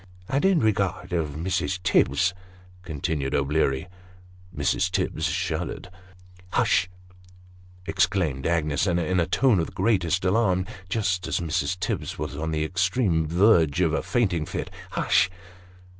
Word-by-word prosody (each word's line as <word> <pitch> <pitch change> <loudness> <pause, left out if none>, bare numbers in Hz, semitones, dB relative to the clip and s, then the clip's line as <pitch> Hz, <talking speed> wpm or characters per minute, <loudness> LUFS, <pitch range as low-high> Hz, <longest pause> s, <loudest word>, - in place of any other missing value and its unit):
" 90 0 -24
And 140 - 0
in 190 -3 +4
regard 95 -4 0
of 80 -4 -1
Mrs. 90 +3 -1
Tibbs," 90 +2 +3 0.5
continued 75 -4 -2
O'Bleary. 70 +1 +1 0.6
Mrs. - - 0
Tibbs - - -1
shuddered. 90 - -3 0.3
" 90 0 -24
Hush! 90 - +2 0.5
" 90 0 -24
exclaimed 90 -8 0
Agnes, 80 0 +1
in 90 -2 +1 0.2
a 85 - +1
tone 125 -8 +3
of 80 - 0
the - - -11
greatest 95 -3 +1
alarm, 95 -2 +2 0.2
just 95 -3 -1
as - - 0
Mrs. 90 +2 -1
Tibbs - - -3
was 75 -1 -4
on 80 +2 -3
the 80 -1 -1
extreme 95 -1 +1
verge 85 -3 +4
of 85 -4 +2
a - - +1
fainting 95 -10 0
fit. - - -4
" - - -20
Hush - - +3
90 Hz, 145 wpm, -25 LUFS, 80-95 Hz, 0.6 s, in